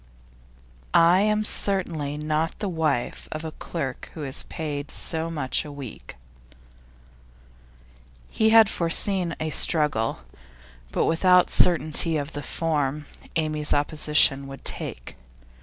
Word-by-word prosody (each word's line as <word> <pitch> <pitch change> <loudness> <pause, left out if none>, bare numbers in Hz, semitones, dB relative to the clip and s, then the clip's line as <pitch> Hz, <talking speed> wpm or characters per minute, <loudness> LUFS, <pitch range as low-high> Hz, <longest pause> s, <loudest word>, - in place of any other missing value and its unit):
'I 170 +2 +6
am 210 +1 +1
certainly 165 -9 0
not 155 +2 -2
the 210 - -3
wife 155 -8 -2
of 155 +1 -5
a 160 - -5
clerk 140 -5 -6
who 155 - -6
is 135 -2 +3
paid 150 -3 -5
so 165 0 -2
much 145 -6 -1
a 150 - -9
week.' 140 -5 -10 2.2
He 220 - +2
had 225 -1 +7
foreseen 175 0 0
a 155 0 -3
struggle, 150 -9 +1 0.7
but - - 0
without 180 +2 +3
certainty 165 -2 +2
of 145 +2 -5
the 145 - -4
form 150 -2 -2 0.3
Amy's 155 -2 +1
opposition 145 -2 +2
would 135 0 -11
take. - - -2
155 Hz, 120 wpm, -24 LUFS, 145-170 Hz, 2.2 s, had